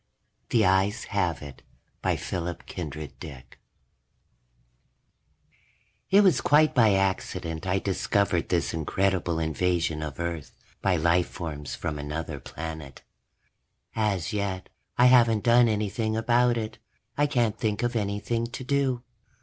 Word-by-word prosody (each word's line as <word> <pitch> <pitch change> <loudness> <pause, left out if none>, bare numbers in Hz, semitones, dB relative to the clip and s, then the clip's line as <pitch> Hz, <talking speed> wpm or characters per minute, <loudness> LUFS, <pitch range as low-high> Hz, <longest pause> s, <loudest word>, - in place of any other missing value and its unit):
_ - - -46
The 110 -3 +3
Eyes 95 +4 +2
Have 85 -6 0
It 70 -2 -10 0.4
by - - +1
PHILIP 85 -1 -4
K. 90 -4 -5 0.3
DICK 65 -5 -11 2.5
It 200 +2 +6
was 190 -4 +4
quite 150 +1 +4
by 110 -6 +5
accident 95 -3 -2
I 90 +1 +2
discovered 95 -2 0
this 85 -2 0
incredible 85 +1 0
invasion 80 0 0
of 75 -1 -6
Earth 85 -3 -4 0.3
by 95 -2 +2
lifeforms 85 -3 -1
from 75 -2 -4
another 75 0 -4
planet. 80 -4 -8 0.9
As 100 -6 0
yet, 100 -3 -3 0.3
I 125 - +6
haven't 120 -4 +5
done 120 0 +5
anything 110 +1 -1
about 120 +1 +3
it; 110 -1 -5 0.4
I 145 0 +2
can't 115 -6 0
think 110 -1 -1
of 120 0 -1
anything 110 +2 -1
to 120 +2 -7
do. 130 -2 0
95 Hz, 125 wpm, -26 LUFS, 80-115 Hz, 2.5 s, It